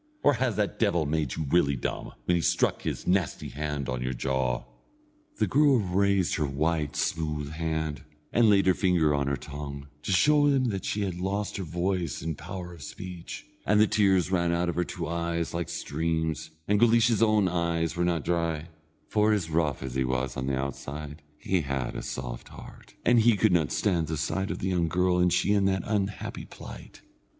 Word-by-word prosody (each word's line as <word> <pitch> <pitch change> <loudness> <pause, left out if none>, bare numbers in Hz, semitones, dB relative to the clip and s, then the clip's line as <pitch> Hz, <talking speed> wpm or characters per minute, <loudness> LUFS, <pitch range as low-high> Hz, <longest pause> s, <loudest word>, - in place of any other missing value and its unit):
Or 145 - +6
has 125 -3 0
that 105 -2 -1
devil 85 -8 +2
made 75 -3 -1
you 80 - -2
really 70 -3 +3
dumb, - - -4
when 90 - +2
he 85 - +1
struck - - +1
his - - -4
nasty 90 -4 0
hand 75 -2 -3
on 65 -1 -2
your 65 0 -2
jaw?" 65 -1 -1 0.7
The - - +2
girl 145 -1 +4
raised 100 -2 +1
her 75 - +1
white 75 +2 -1
smooth 75 -3 -1
hand, 80 -1 -2 0.3
and 115 -2 +5
laid 100 -1 +5
her 95 - +5
finger 90 -5 +2
on 70 -1 0
her 70 - +1
tongue, 70 +1 -7
to 95 - -3
show 145 +9 +5
him 135 -3 +3
that 95 -3 -3
she 105 - -1
had 90 -3 -3
lost 100 +3 -2
her 95 - -3
voice 90 0 -2
and 80 -1 -2
power 90 +3 -7
of 85 - -13
speech, 90 +5 -8 0.2
and 105 +1 +3
the 110 - +7
tears 95 -4 +2
ran 85 -2 +2
out 85 +1 +1
of - - -2
her 90 - +1
two 85 -1 -5
eyes 85 0 -2
like 85 0 -2
streams, 80 -1 -2 0.2
and 105 0 +3
Guleesh's 115 -1 +4
own 110 -3 +4
eyes 85 -2 0
were 85 - 0
not 85 -3 0
dry, 85 -2 -1 0.4
for 105 0 +3
as 90 -6 -1
rough 80 -5 0
as 65 -2 -5
he 65 0 +1
was 65 0 -1
on 65 +1 -3
the 70 -1 0
outside 75 +2 -5 0.2
he 95 +2 0
had 70 -3 -3
a - - -3
soft - - -6
heart, - - -13
and 120 -1 +5 0.2
could 110 -2 +3
not 80 -4 +2
stand 85 -6 +1
the 80 0 -2
sight 95 +6 -1
of 85 - -2
the 95 - -2
young 90 -3 +1
girl, 90 +1 +2
and 90 0 +3
she 95 +3 +2
in 100 -1 +3
that 95 -1 +1
unhappy 100 -2 -2
plight. - - -11
85 Hz, 200 wpm, -28 LUFS, 75-95 Hz, 0.7 s, the